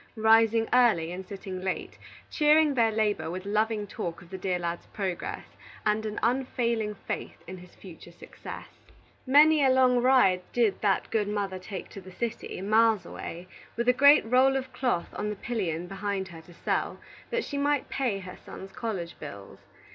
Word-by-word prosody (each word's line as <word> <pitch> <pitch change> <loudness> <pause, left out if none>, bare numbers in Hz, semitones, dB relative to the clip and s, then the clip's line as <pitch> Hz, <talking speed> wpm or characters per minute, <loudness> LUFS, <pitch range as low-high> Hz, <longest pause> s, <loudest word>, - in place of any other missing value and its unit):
rising 225 0 +4
early 220 -10 +4
and 185 +1 -7
sitting 190 -2 -7
late, 190 0 -4 0.3
cheering 300 -1 +4
their 230 -4 +3
labor 215 -5 0
with 185 +2 -6
loving 215 +1 0
talk 170 -4 -5
of 175 - -19
the 190 - -5
dear 185 -1 -1
lad's 170 -1 -4
progress, 190 -4 -5 0.3
and 215 +1 +1
an 210 - -4
unfailing 235 -3 0
faith - - -6
in 185 +1 -8
his 180 0 -15
future 175 -2 -13
success. 170 - -10 0.6
Many 300 +2 +6
a 265 - +5
long 255 -1 +4
ride 245 -8 +4
did 230 -5 +1
that 200 -3 +1
good 215 -2 +1
mother 200 -2 -2
take 185 0 -7
to 195 - -10
the 185 0 -12
city, 235 0 -4
miles 215 -1 +3
away, 170 +1 -8 0.3
with 235 +1 -1
a 250 - +6
great 285 +2 +6
roll 260 +3 +4
of 260 -1 -6
cloth 245 -10 -1
on 210 - -3
the 210 - -3
pillion 180 -8 -3
behind 195 0 -3
her 165 -2 -11
to 175 +2 -17
sell, - - -2 0.3
that 480 -1 -1
she 285 - -4
might 290 -1 +1
pay 250 -7 -1
her 185 -2 -9
son's 190 0 -10
college 190 -8 -5
bills. 100 -1 -10
210 Hz, 175 wpm, -28 LUFS, 185-245 Hz, 0.6 s, Many